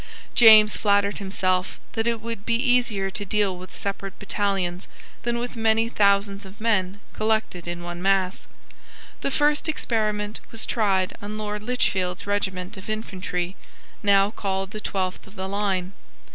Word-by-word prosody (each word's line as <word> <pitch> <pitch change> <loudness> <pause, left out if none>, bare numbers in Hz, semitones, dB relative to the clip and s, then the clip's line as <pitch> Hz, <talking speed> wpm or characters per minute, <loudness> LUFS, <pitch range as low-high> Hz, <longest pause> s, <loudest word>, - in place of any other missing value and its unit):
James 215 -2 +8
flattered 200 0 +2
himself 185 -2 -1
that 225 0 -1
it 230 -1 +1
would 230 -2 -5
be 230 +1 +1
easier 235 -6 +2
to 205 - -4
deal 200 -1 +1
with 180 0 -10
separate 195 -1 -4
battalions 195 -3 -1 0.3
than 235 0 -1
with 245 +1 -4
many 225 0 +2
thousands 200 -2 +2
of 195 +1 -12
men 200 -4 +1
collected 215 -5 -1
in 175 0 -4
one 175 0 -6
mass. 195 -1 +1 0.7
The - - 0
first 295 +3 +2
experiment 215 -7 -1
was 225 - -3
tried 195 -5 +1
on 210 +1 -5
Lord 210 -1 -4
Lichfield's 190 -6 0
regiment 190 -3 -2
of 190 - -9
infantry, 185 -4 -3 0.5
now 200 0 +4
called 195 -2 -3
the 215 -1 -6
Twelfth 185 -2 -3
of 195 - -16
the 190 -1 -4
Line. 195 -2 -1
200 Hz, 150 wpm, -24 LUFS, 190-220 Hz, 0.7 s, James